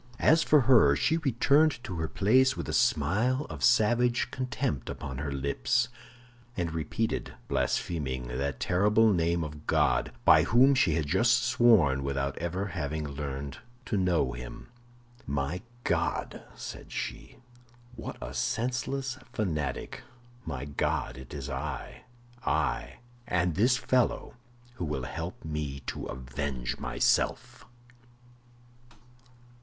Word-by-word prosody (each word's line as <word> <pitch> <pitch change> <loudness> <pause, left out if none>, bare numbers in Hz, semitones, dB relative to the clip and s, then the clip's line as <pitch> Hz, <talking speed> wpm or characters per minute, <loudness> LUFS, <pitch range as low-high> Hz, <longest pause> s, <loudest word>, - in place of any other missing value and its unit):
As 160 +1 +5
for 150 -2 +5
her, 115 - +6
she 160 - +2
returned 145 0 +3
to 95 - -6
her 80 - -1
place 130 +9 +3
with - - -4
a - - -3
smile 115 - +2
of - - -6
savage 120 +1 +3
contempt 125 - -2
upon 65 -2 -6
her 70 0 -3
lips, 70 - 0 0.7
and 85 -3 -2
repeated, 80 +8 -2
blaspheming, 65 -7 -1
that 65 +1 -3
terrible 105 +4 +3
name 85 -1 +1
of 75 0 -8
God, - - +2
by - - +8
whom 130 +5 +5
she 135 - +3
had 80 -3 0
just 115 - +3
sworn 115 - +4
without 70 0 -2
ever 90 +4 -2
having 75 -3 -3
learned 70 -1 -5 0.3
to 110 - -2
know 90 -9 +2
Him. - - -9 0.6
"My 70 +5 -2 0.2
God," - - -1
said - - -8
she, - - -5 0.6
"what - - -7
a - - -7
senseless 130 - -2
fanatic! 80 - -3 0.5
My 70 -4 -4
God, 70 -3 -1
it 65 0 -11
is 70 -2 -6
I—I—and 120 - -3
this 120 +8 +3
fellow 125 -1 0 0.4
who 85 - -2
will 75 -4 -3
help 80 +7 -6
me 75 -3 -4
to - - -5
avenge 65 0 -4
myself." - - 0
85 Hz, 120 wpm, -29 LUFS, -, 0.7 s, by